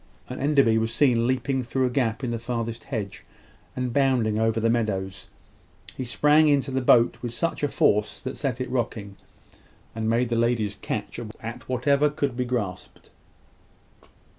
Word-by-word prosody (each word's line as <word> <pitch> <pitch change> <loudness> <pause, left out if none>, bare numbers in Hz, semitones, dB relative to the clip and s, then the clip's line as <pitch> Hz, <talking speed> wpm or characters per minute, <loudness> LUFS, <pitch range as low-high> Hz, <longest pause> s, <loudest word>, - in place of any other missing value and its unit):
and 125 - -6
Enderby 140 -6 +3
was 115 0 -1
seen 120 -2 +3
leaping 130 +1 0
through 130 +2 -1
a - - +1
gap 125 -2 -1
in 125 - -1
the 115 - -2
farthest 115 -1 -4
hedge, 105 -7 -5 0.5
and 125 -2 -2
bounding 125 -6 +2
over 115 0 +1
the 115 - +1
meadow. 110 -5 0 0.9
He 130 - -4
sprang 150 +5 +4
into 140 -2 +2
the 130 0 0
boat 120 -1 +4
with 120 -2 -4
a 165 -3 0
force 105 -5 +1
which 130 - -4
set 135 -4 -2
it 130 -1 -4
rocking, 110 -5 -3 0.8
and 110 0 -2
made 120 +1 +1
the 120 - 0
ladies 115 -3 +1
catch 105 +2 -5 0.2
at 115 +3 -7
whatever 140 +4 +2
could 140 -3 -2
be 125 0 -1
grasped. 105 -7 -5
120 Hz, 165 wpm, -25 LUFS, 115-130 Hz, 0.9 s, sprang